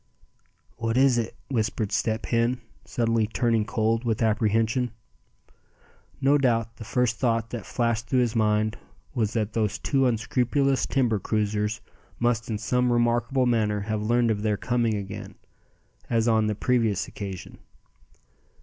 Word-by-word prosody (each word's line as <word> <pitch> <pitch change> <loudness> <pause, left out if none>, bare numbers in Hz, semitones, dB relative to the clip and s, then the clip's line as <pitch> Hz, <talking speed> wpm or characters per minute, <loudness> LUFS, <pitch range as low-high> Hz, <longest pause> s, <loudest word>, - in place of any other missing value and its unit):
"What 115 +1 -1
is 130 -2 +4
it?" 115 -1 -4
whispered 110 -4 -1
Step 110 0 0
Hen, 120 +1 +1 0.3
suddenly 115 -2 +1
turning 115 -1 +1
cold 115 0 0
with 115 -1 0
apprehension. 115 +3 +1 1.3
No 140 +2 +4
doubt 115 -3 +1
the - - -8
first 120 +1 0
thought 115 -3 0
that 115 -5 -6
flashed 115 -1 -1
through 130 -2 +2
his 120 -1 0
mind 110 0 +1 0.3
was 110 -3 0
that 110 -2 -1
those 110 -3 0
two 135 -2 +1
unscrupulous 125 +3 +1
timber 120 -6 +1
cruisers 105 0 -1 0.4
must 120 -1 0
in 110 - -1
some 125 +4 +1
remarkable 120 +2 +2
manner 110 -4 +1
have 110 +1 -2
learned 120 +2 +2
of 105 -2 -1
their 105 -1 0
coming 120 -2 0
again, 100 -1 -6 0.7
as 115 -1 +2
on 110 -2 +3
the 105 - -1
previous 115 -4 +1
occasion. 95 -3 -7
115 Hz, 140 wpm, -26 LUFS, 110-120 Hz, 1.3 s, is